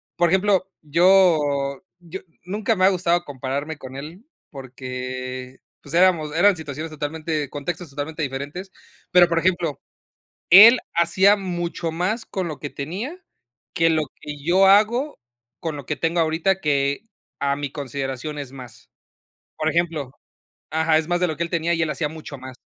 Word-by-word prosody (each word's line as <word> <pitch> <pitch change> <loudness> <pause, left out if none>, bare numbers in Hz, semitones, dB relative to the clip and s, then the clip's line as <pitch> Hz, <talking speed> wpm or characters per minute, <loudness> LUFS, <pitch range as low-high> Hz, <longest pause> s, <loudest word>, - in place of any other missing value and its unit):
por 175 -1 +2
ejemplo, 190 +1 +2
yo 155 -4 +3 0.2
yo 175 +2 -8 0.3
nunca 210 +4 -1
me 185 -1 +3
ha - - +7
gustado 175 -2 +1
compararme 140 +3 -4
con 130 -2 -10
él, 160 - -9 0.2
porque 130 -1 -7 0.2
pues, 145 +3 -7
éramos 170 -4 +3
eran 200 +4 +5
situaciones 155 +1 -6
totalmente 155 0 -3
contextos 165 +4 -5
totalmente 150 +3 -5
diferentes, 145 +8 -5 0.4
pero, 180 -1 +7
por 165 0 +2
ejemplo, 175 -4 0 0.7
él 220 +7 +10 0.2
hacía 185 +4 +4
mucho 175 -3 -3
más 195 +8 -2
con 185 -2 -3
lo 155 -3 -6
que 145 - -5
tenía, 215 - -6 0.5
que 165 0 +3
lo 160 -1 +2 0.2
que 150 0 -7
yo 185 +4 +4
hago 225 +9 +3 0.4
con 165 -3 -4
lo 140 - -9
que 150 - -2
tengo 165 +5 -1
ahorita, 165 +4 +1
que 140 +3 0 0.4
a 140 0 +1
mi 145 -1 -5
consideración 140 +1 -5
es 140 -3 -7
más, 125 -5 -12 0.7
por 155 - -1
ejemplo. 160 -6 -1 0.6
Ajá, 160 0 +2
es 155 - -2
más 175 0 0
de 180 - +3
lo 160 -3 -4
que 170 - -1
él 170 - -7
tenía 170 0 0
y 165 - -2
él 160 - 0
hacía 150 -1 -2
mucho 155 -2 -9
más, 130 0 -9
160 Hz, 165 wpm, -22 LUFS, 140-180 Hz, 0.7 s, él